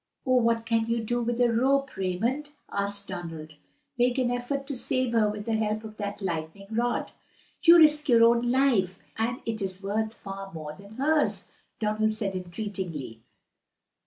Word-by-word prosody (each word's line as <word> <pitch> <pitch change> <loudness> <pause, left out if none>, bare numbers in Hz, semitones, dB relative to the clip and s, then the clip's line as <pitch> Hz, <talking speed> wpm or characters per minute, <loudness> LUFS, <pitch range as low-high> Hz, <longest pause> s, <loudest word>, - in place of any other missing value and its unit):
"What 230 -3 +2
can 225 -1 +1
you 230 +1 0
do 240 +2 -1
with 240 0 -1
a 240 -1 +4
rope, 275 +4 +2
Raymond?" 225 +11 -1 0.2
asked 200 0 -2
Donald. 165 -5 -7 0.4
"Make 245 +1 +3
an 250 -2 +1
effort 245 +3 -2
to 280 -1 -4
save 255 0 -1
her 220 -2 +4
with 210 0 -5
the 225 - -1
help 215 0 0
of 215 -1 -9
that 205 -1 -5
lightning 165 +2 -4
rod." 240 +2 0 0.5
"You 345 0 +8
risk 300 -2 +5
your 230 -2 +6
own 235 +1 +4
life, 240 -8 +2 0.2
and 235 +2 -1
it 220 -2 -3
is 190 0 -4
worth 215 +2 -1
far 195 0 -8
more 155 -2 -6
than 200 +5 -14
hers," 295 +4 +1 0.3
Donald 215 0 +1
said 200 -3 -2
entreatingly. 180 - -5
220 Hz, 165 wpm, -27 LUFS, 195-245 Hz, 0.5 s, You